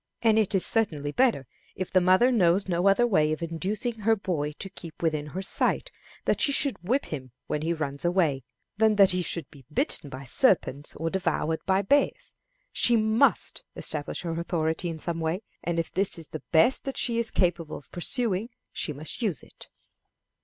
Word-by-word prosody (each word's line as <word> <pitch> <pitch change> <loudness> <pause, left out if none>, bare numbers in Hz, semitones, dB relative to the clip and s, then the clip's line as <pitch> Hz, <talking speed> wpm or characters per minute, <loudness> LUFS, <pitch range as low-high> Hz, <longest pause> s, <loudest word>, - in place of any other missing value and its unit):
And 220 -1 +4
it 210 -1 +1
is 190 - +2
certainly 155 -11 +1
better, 235 - +2 0.3
if 185 - -5
the 185 - +4
mother 185 +8 +4
knows 190 -4 +3
no 175 +1 +1
other 195 +5 +4
way 155 -10 +2
of 155 +2 -3
inducing 205 +8 -3
her 225 +2 +3
boy 170 -8 -2
to 195 - -6
keep 170 -4 -11
within 155 -2 0
her 185 +6 -5
sight, - - +1 0.3
that - - +1
she 280 - +3
should 275 - -1
whip 250 +10 0
him 130 -4 -7 0.2
when 150 - -3
he 160 +2 -1
runs 145 -4 -3
away, 175 -6 +1 0.4
than 220 0 +3
that 195 -2 +6
he 180 0 0
should 170 -4 -3
be 140 -2 -15
bitten 145 - +1
by 130 +1 -8
serpents 145 - +2
or 165 +1 -3
devoured 165 -3 -1
by 190 +1 +2
bears. 285 +9 +1 0.4
She 240 - +3
must 220 +5 +2
establish 150 +2 0
her 170 - -3
authority 170 0 -2
in 165 - -5
some 165 +1 -4
way, 165 +5 -2 0.2
and 170 -1 -2
if 165 - -2
this 195 0 0
is 165 -2 -8
the 155 - -7
best 230 +11 +4
that 270 - -3
she 235 -1 +1
is 235 - +1
capable 170 -4 -1
of 140 - -16
pursuing, 220 +2 -1 0.2
she 150 - -2
must 155 - -4
use 200 - -1
it. - - -14
180 Hz, 195 wpm, -26 LUFS, 155-215 Hz, 0.4 s, that